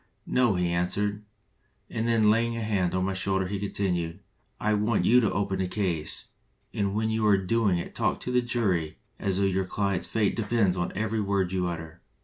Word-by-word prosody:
'No,' 120 -6 +2
he 90 -1 +1
answered; 100 +4 -1 0.7
and 115 0 -2
then 110 -2 +4
laying 115 +1 +1
a 115 - -2
hand 95 -5 0
on 95 0 +1
my 95 - -1
shoulder, 95 0 0
he 100 +2 -3
continued: 90 -3 -2 0.4
'I 105 0 +1
want 105 +1 +1
you 125 +2 +6
to 110 -5 +1
open 100 -1 -1
the 95 - 0
case, 90 -6 -2 0.5
and 100 -1 -1
when 110 +1 0
you 110 0 0
are 100 -2 +5
doing 95 0 +1
it 85 - -5
talk - - 0
to 125 - -3
the 125 0 +3
jury 100 -10 -1 0.2
as 95 -2 -1
though 100 - +1
your 95 -1 +1
client's 100 -1 -1
fate 110 -3 +1
depends 105 -4 +1
on 90 -1 -2
every 110 +2 -1
word 100 -3 0
you 90 -1 0
utter. 80 0 -6
100 Hz, 200 wpm, -27 LUFS, 90-110 Hz, 0.7 s, you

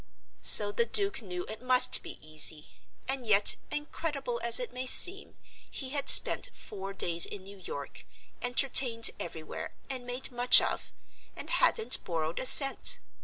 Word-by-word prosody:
So 205 -1 +7
the 235 +3 -4
Duke 400 - -2
knew 180 -4 -10
it 220 +1 -12
must 255 0 +1
be - - -12
easy. 155 0 -1 0.4
And 265 -3 -5
yet, 205 -1 +2
incredible 295 -4 -8
as 235 0 +3
it 245 -1 -9
may 255 +1 -8
seem, 380 +9 +3 0.3
he 265 - -8
had 280 +1 -3
spent - - +5
four 195 -1 -11
days 170 -3 -1
in 200 -2 -12
New 200 +1 -16
York, 140 -6 -13 0.3
entertained 245 -2 +1
everywhere, 160 -2 -11 0.2
and 250 -2 -9
made 250 +2 -2
much 245 0 +4
of, - - -8 0.4
and - - -10
hadn't 450 -1 -1
borrowed 160 -1 -8
a 260 - -2
cent. 275 0 +3
240 Hz, 155 wpm, -25 LUFS, 195-265 Hz, 0.4 s, So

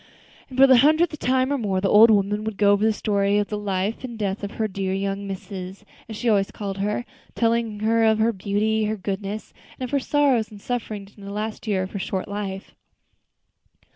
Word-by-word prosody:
And 260 - -9
then 265 - +7
for - - +11
the 260 -1 +7
hundredth 310 +3 +3
time 260 +2 +1
or 280 - -1
more 195 -4 0
the 195 - 0
old 215 +4 +7
woman 205 0 +2
would 220 -2 -4
go 200 -1 +4
over 205 +1 +2
the 220 - +4
story 205 -1 +1
of 205 -1 0
the 210 - -2
life 200 +2 -2
and 240 -3 -6
death 205 -1 -2
of 200 - -2
her 220 - -1
"dear 190 -1 -2
young 195 +1 -3
missus," 195 0 -7 0.2
as 220 - -6
she 240 - -3
always 200 -3 +3
called 200 -2 -6
her; 210 +4 -1 0.3
telling 230 -2 0
of 225 -1 +3
her 225 +1 +2
beauty, 210 +2 0
her 215 +1 -2
goodness, 200 +2 -5 0.3
and - - -4
of 250 - -4
her 285 - +2
sorrows 270 -5 +2
and 210 - -12
sufferings 210 -3 -5
during 200 -1 -12
the - - -6
last 215 +2 -5
year 195 -3 +1
of 185 - -7
her 200 - -4
short 190 0 -3
life. 200 -1 -5
210 Hz, 220 wpm, -23 LUFS, 200-225 Hz, 0.3 s, for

